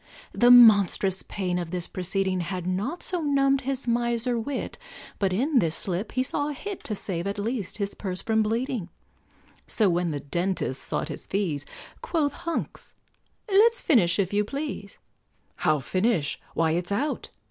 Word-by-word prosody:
The 240 Hz, -, +4 dB
monstrous 200 Hz, -5 st, +6 dB
pain 180 Hz, -3 st, -3 dB
of 175 Hz, -2 st, -4 dB
this 175 Hz, 0 st, -3 dB
proceeding 190 Hz, 0 st, -1 dB
Had 180 Hz, 0 st, -4 dB
not 205 Hz, -, -2 dB
so 360 Hz, -2 st, -2 dB
numbed 275 Hz, -2 st, +2 dB
his 270 Hz, -1 st, -3 dB
miser 235 Hz, +1 st, +1 dB
wit, 255 Hz, +4 st, -4 dB, 0.4 s
But 195 Hz, -2 st, +1 dB
in 260 Hz, +8 st, +2 dB
this 165 Hz, -6 st, +1 dB
slip 185 Hz, +3 st, -1 dB
he 255 Hz, -, +1 dB
saw 285 Hz, +2 st, 0 dB
a -, -, -3 dB
hit 395 Hz, +7 st, -7 dB
To 215 Hz, -, -2 dB
save, 185 Hz, -2 st, -3 dB
at 200 Hz, -, -3 dB
least, 210 Hz, -2 st, -3 dB
his 200 Hz, -2 st, -2 dB
purse 185 Hz, -3 st, -4 dB
from 220 Hz, -1 st, +2 dB
bleeding; 225 Hz, -2 st, -1 dB, 0.8 s
So 210 Hz, -5 st, +2 dB
when 175 Hz, 0 st, 0 dB
the 145 Hz, -2 st, -3 dB
dentist 175 Hz, -2 st, -2 dB
sought -, -, -2 dB
his 150 Hz, -, -6 dB
fees, 170 Hz, -8 st, -2 dB, 0.3 s
Quoth 295 Hz, -5 st, 0 dB
Hunks, 335 Hz, -1 st, -5 dB, 0.5 s
"Let's 445 Hz, +4 st, +4 dB
finish, 195 Hz, -, +3 dB
if 195 Hz, -1 st, 0 dB
you 205 Hz, +1 st, +3 dB
please," 275 Hz, -4 st, -5 dB, 0.6 s
"How, 155 Hz, -1 st, +2 dB
finish! 185 Hz, -, 0 dB, 0.2 s
why, 165 Hz, -1 st, +2 dB
it's 175 Hz, +3 st, -2 dB
out!" 275 Hz, +10 st, -1 dB
205 Hz, 165 wpm, -26 LUFS, 180-260 Hz, 0.8 s, monstrous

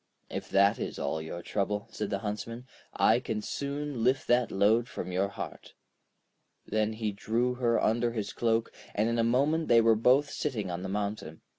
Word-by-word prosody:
'If -, -, -5 dB
that 100 Hz, +2 st, +4 dB
is -, -, -4 dB
all 80 Hz, -, -2 dB
your 80 Hz, +2 st, -6 dB
trouble,' 105 Hz, 0 st, -2 dB
said 105 Hz, -, -3 dB
the 100 Hz, -, 0 dB
Huntsman, 115 Hz, +4 st, -4 dB, 0.3 s
'I 115 Hz, +2 st, +4 dB
can 110 Hz, -3 st, -3 dB
soon 140 Hz, -3 st, -3 dB
lift 130 Hz, +2 st, +2 dB
that 120 Hz, 0 st, +3 dB
load 110 Hz, +5 st, +3 dB
from 90 Hz, -, -5 dB
your 95 Hz, +2 st, +1 dB
heart.' 100 Hz, -, -8 dB, 0.9 s
Then 110 Hz, 0 st, 0 dB
he 110 Hz, -1 st, -2 dB
drew 115 Hz, +5 st, 0 dB
her 120 Hz, -2 st, +1 dB
under 120 Hz, +2 st, +1 dB
his 105 Hz, -4 st, -4 dB
cloak, 115 Hz, -1 st, +1 dB, 0.2 s
and 105 Hz, +2 st, +2 dB
in 115 Hz, 0 st, 0 dB
a -, -, +3 dB
moment 140 Hz, +7 st, +2 dB
they 115 Hz, -, +6 dB
were 115 Hz, 0 st, +5 dB
both 130 Hz, +6 st, +3 dB
sitting 110 Hz, -11 st, -2 dB
on 85 Hz, +1 st, -4 dB
the 95 Hz, -, -4 dB
mountain. 100 Hz, -5 st, -4 dB
115 Hz, 185 wpm, -29 LUFS, 100-120 Hz, 0.9 s, they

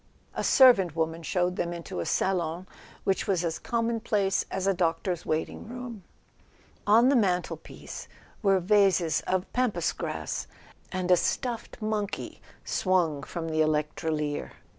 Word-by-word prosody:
A -, -, -3 dB
servant 195 Hz, -, +6 dB
woman 165 Hz, 0 st, -1 dB
showed 180 Hz, +2 st, 0 dB
them 175 Hz, -, -1 dB
into 170 Hz, -, -6 dB
a 85 Hz, -, -3 dB
salon 175 Hz, -2 st, 0 dB, 0.4 s
which 195 Hz, -, 0 dB
was 180 Hz, -3 st, +1 dB
as 165 Hz, -1 st, -2 dB
commonplace 225 Hz, -4 st, 0 dB
as 190 Hz, 0 st, -2 dB
a 195 Hz, -, +3 dB
doctor's 175 Hz, 0 st, -1 dB
wait¬ 155 Hz, 0 st, +1 dB
ing -, -, -10 dB
room. 245 Hz, -4 st, -7 dB, 0.8 s
On 230 Hz, +5 st, +6 dB
the 280 Hz, -, +4 dB
mantelpiece 185 Hz, -6 st, -2 dB, 0.3 s
were 195 Hz, -3 st, +4 dB
vases 180 Hz, -4 st, +3 dB
of 185 Hz, 0 st, -1 dB
Pampas 250 Hz, -3 st, +1 dB
grass, -, -, -4 dB, 0.4 s
and 185 Hz, -1 st, -1 dB
a -, -, +9 dB
stuffed 235 Hz, 0 st, -2 dB
monkey 210 Hz, -2 st, -3 dB, 0.2 s
swung 175 Hz, -6 st, +1 dB
from 165 Hz, +2 st, -5 dB
the 155 Hz, 0 st, +1 dB
electrolier. 150 Hz, -1 st, -1 dB
185 Hz, 140 wpm, -28 LUFS, 165-210 Hz, 0.8 s, a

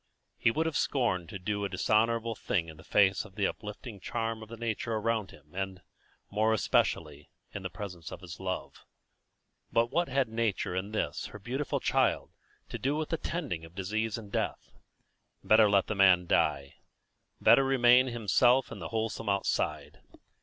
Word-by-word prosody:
He -, -, +4 dB
would 155 Hz, +8 st, 0 dB
have 160 Hz, -2 st, -2 dB
scorned 105 Hz, -, 0 dB
to 105 Hz, -, -5 dB
do 100 Hz, +2 st, -2 dB
a 100 Hz, -, -1 dB
dishonourable 115 Hz, +4 st, +1 dB
thing 85 Hz, -5 st, -2 dB
in 80 Hz, -, -11 dB
the -, -, -14 dB
face 95 Hz, -2 st, +3 dB
of 100 Hz, -3 st, -15 dB
the 105 Hz, -2 st, +1 dB
uplifting 105 Hz, +1 st, -5 dB
charm 115 Hz, +2 st, -3 dB
of 110 Hz, -, -10 dB
the 115 Hz, -, -8 dB
nature 115 Hz, 0 st, -2 dB
around 110 Hz, -2 st, -1 dB
him, 75 Hz, +1 st, -17 dB
and, 95 Hz, -1 st, -4 dB, 0.5 s
more 110 Hz, +2 st, +2 dB
especially, 75 Hz, -7 st, 0 dB, 0.2 s
in -, -, -5 dB
the -, -, -4 dB
presence 90 Hz, -6 st, -8 dB
of -, -, -8 dB
his 85 Hz, -3 st, -9 dB
love; 95 Hz, -1 st, -5 dB, 0.9 s
but 115 Hz, +1 st, +2 dB
what 170 Hz, +4 st, +1 dB
had 135 Hz, 0 st, +1 dB
nature 110 Hz, -5 st, -1 dB
and 95 Hz, +3 st, -3 dB
this, 110 Hz, -, -2 dB
her -, -, -10 dB
beautiful 125 Hz, +7 st, -2 dB
child, -, -, +1 dB, 0.4 s
to -, -, -5 dB
do 140 Hz, +3 st, 0 dB
with 155 Hz, 0 st, -2 dB
the 165 Hz, -, 0 dB
tending 150 Hz, -, -4 dB
of 80 Hz, +1 st, -13 dB
disease 110 Hz, +3 st, -2 dB
and 105 Hz, -3 st, -10 dB
death? -, -, -3 dB, 0.7 s
Better 110 Hz, -1 st, +6 dB
let 100 Hz, -2 st, +4 dB
the -, -, -2 dB
man 95 Hz, -3 st, +5 dB
die; 70 Hz, -4 st, +1 dB, 0.6 s
better 135 Hz, -, +6 dB
remain 130 Hz, -1 st, +5 dB
himself 120 Hz, +2 st, +3 dB
in -, -, -7 dB
the -, -, -6 dB
wholesome 110 Hz, -1 st, -2 dB
outside. 100 Hz, 0 st, -1 dB
110 Hz, 175 wpm, -30 LUFS, 95-115 Hz, 0.9 s, Better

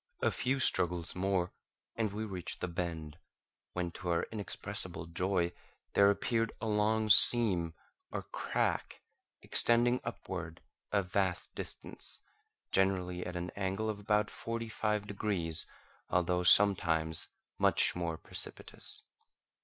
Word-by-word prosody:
A -, -, +3 dB
few 135 Hz, +2 st, -1 dB
struggles 85 Hz, -8 st, +5 dB
more, 90 Hz, -1 st, 0 dB, 0.4 s
and 110 Hz, -3 st, -1 dB
we 110 Hz, +2 st, -4 dB
reached 95 Hz, -5 st, -5 dB
the -, -, -2 dB
bend, 85 Hz, -3 st, -5 dB, 0.5 s
when 90 Hz, -1 st, -2 dB
to 90 Hz, +1 st, -6 dB
our 85 Hz, -1 st, +1 dB
inexpressible 105 Hz, -6 st, -4 dB
joy, 85 Hz, +1 st, 0 dB, 0.4 s
there 100 Hz, 0 st, +6 dB
appeared 115 Hz, +2 st, 0 dB
a -, -, -4 dB
long 110 Hz, +1 st, +1 dB
seam 95 Hz, -8 st, +5 dB, 0.3 s
or -, -, -4 dB
crack -, -, -2 dB, 0.4 s
extending 120 Hz, +1 st, +4 dB
upward 85 Hz, -3 st, -6 dB, 0.3 s
a 100 Hz, -1 st, +2 dB
vast 95 Hz, -1 st, -1 dB
distance, -, -, -8 dB, 0.5 s
generally 90 Hz, -2 st, +1 dB
at 90 Hz, -, -6 dB
an 90 Hz, +1 st, -4 dB
angle 100 Hz, +2 st, -2 dB
of 105 Hz, -, -8 dB
about 105 Hz, 0 st, +1 dB
forty 115 Hz, 0 st, -4 dB
five 105 Hz, -1 st, -1 dB
degrees, 100 Hz, -6 st, -3 dB, 0.4 s
although 90 Hz, 0 st, +1 dB
sometimes 85 Hz, -4 st, +4 dB, 0.3 s
much -, -, +3 dB
more 85 Hz, -2 st, -2 dB
precipitous. -, -, -7 dB
95 Hz, 120 wpm, -32 LUFS, 85-105 Hz, 0.5 s, there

